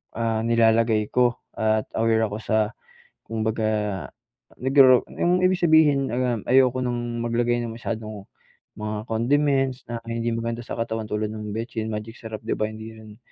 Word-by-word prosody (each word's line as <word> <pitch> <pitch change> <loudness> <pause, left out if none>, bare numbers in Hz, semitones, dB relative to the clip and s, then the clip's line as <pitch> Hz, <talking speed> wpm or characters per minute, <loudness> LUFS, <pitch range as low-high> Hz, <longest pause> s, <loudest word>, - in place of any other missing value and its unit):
ah, 115 -1 0
nilalagay 115 -1 +3
ko, 125 -1 +3 0.2
at 110 0 +1
aware 115 0 +3
ako 105 - -4
sa 110 0 +1 0.5
kumbaga 110 - -1 0.5
naggaw 130 -1 +6
yung 180 +1 +2
ibig 185 0 +3
sabihin, 155 -5 +4
uhm, 120 -3 -1
ayoko 130 0 +5
ng 120 -1 -2
maglagay 120 +1 +1
ng 115 -1 -5
masyadong 110 -3 -5 0.5
mga 105 +1 -4
condiments 135 +2 +1
na 120 - -3
hindi 115 0 -2
maganda 115 +1 -3
sa - - -5
katawan 110 -1 -2
tulad 105 0 -1
nung 105 -1 -6
betsin, 110 -1 -4
magic 110 +1 -5
sarap, 110 -1 -7
'di - - 0
ba, 110 - 0
hindi 110 +1 -9
rin 110 -1 -13
115 Hz, 155 wpm, -24 LUFS, 110-125 Hz, 0.5 s, naggaw